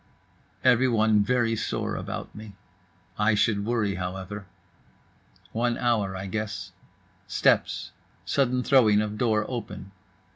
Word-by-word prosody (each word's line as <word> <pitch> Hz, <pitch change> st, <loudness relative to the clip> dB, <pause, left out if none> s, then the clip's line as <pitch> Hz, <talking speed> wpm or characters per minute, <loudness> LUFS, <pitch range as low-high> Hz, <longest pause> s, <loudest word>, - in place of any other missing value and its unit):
Everyone 115 Hz, -4 st, +4 dB
very 115 Hz, +1 st, +1 dB
sore -, -, -2 dB
about -, -, -6 dB
me. 105 Hz, -1 st, -10 dB, 0.7 s
I 105 Hz, +1 st, +3 dB
should 105 Hz, -1 st, +1 dB
worry, 110 Hz, -4 st, 0 dB
however. 95 Hz, +2 st, -5 dB, 1.0 s
One 120 Hz, +1 st, 0 dB
hour, 110 Hz, -6 st, 0 dB
I 95 Hz, +1 st, -5 dB
guess. 105 Hz, -3 st, -4 dB, 0.6 s
Steps. 100 Hz, -, +1 dB, 0.3 s
Sudden 125 Hz, -2 st, +1 dB
throwing 115 Hz, -7 st, +5 dB
of 105 Hz, 0 st, -3 dB
door 110 Hz, -3 st, +2 dB
open. 115 Hz, -5 st, -6 dB
110 Hz, 110 wpm, -26 LUFS, 100-120 Hz, 1.0 s, throwing